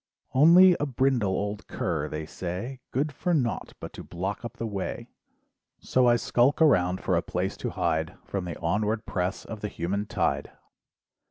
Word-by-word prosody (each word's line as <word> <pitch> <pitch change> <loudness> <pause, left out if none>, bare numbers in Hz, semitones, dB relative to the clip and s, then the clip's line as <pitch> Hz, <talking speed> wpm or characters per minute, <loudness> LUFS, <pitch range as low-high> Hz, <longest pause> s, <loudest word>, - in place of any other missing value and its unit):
"Only 175 +6 +8
a 145 - 0
"brindle 130 -5 +1
old 105 +2 -3
cur" 80 -4 -2
they 75 0 -4
say, 95 +11 -5
"Good 145 +4 -1
for 175 +5 0
naught 125 -7 -1
but - - -8
to - - -8
block 95 +6 -4
up 120 0 -7
the 115 - -3
way, 100 -4 -4 0.7
"So 130 -1 +2
I 120 - +6
skulk 120 +3 +2
around 90 - +4
for 90 - +1
a 85 - +2
place 90 +2 -2
to - - -3
hide 80 -1 -1
"From 95 -2 -3
the 85 - -5
onward 105 +6 0
press 90 0 -2
of 110 -2 -7
the 105 - -2
human 100 +2 -3
tide. - - 0
105 Hz, 175 wpm, -27 LUFS, 90-125 Hz, 0.7 s, Only